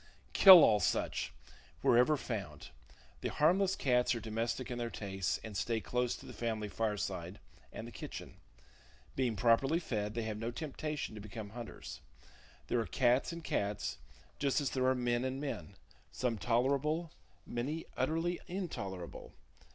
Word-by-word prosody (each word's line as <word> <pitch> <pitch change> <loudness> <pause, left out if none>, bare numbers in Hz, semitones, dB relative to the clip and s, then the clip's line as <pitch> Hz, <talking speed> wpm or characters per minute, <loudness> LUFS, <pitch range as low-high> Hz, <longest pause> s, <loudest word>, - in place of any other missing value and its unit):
Kill 185 -4 +11
all 105 -2 +5
such, 90 - 0 0.5
wherever 125 +6 +5
found. 100 - -5 0.5
The - - -2
harmless 185 +5 +3
cats 125 -4 +2
are - - -3
domestic 115 +3 -2
in 120 - -3
their 120 -1 -2
tastes, 95 -4 -2
and 110 -2 -7
stay 115 +4 0
close 125 +2 -1
to - - -12
the - - -9
family 110 -3 -2
fireside 100 -4 -2 0.3
and - - -7
the - - -9
kitchen. - - -8 0.8
Being 125 -4 +1
properly 120 - +3
fed, 110 -9 -3
they 115 - -1
have 110 -1 -4
no 115 +1 -2
temptation 150 +1 -4
to 105 - -8
become 105 0 -7
hunters. 120 0 -8 0.6
There 120 - 0
are 115 - -1
cats 125 - +2
and 170 0 -7
cats, 100 - -2 0.4
just 140 0 +2
as 140 -3 -1
there 130 -1 +1
are 130 - +4
men 120 -1 0
and 130 +1 -2
men: 135 - -5 0.4
some 120 -4 -1
tolerable, 140 - +1 0.3
many 140 +7 -3
utterly 165 +6 0
intolerable. 100 - -5
120 Hz, 150 wpm, -34 LUFS, 110-140 Hz, 0.8 s, Kill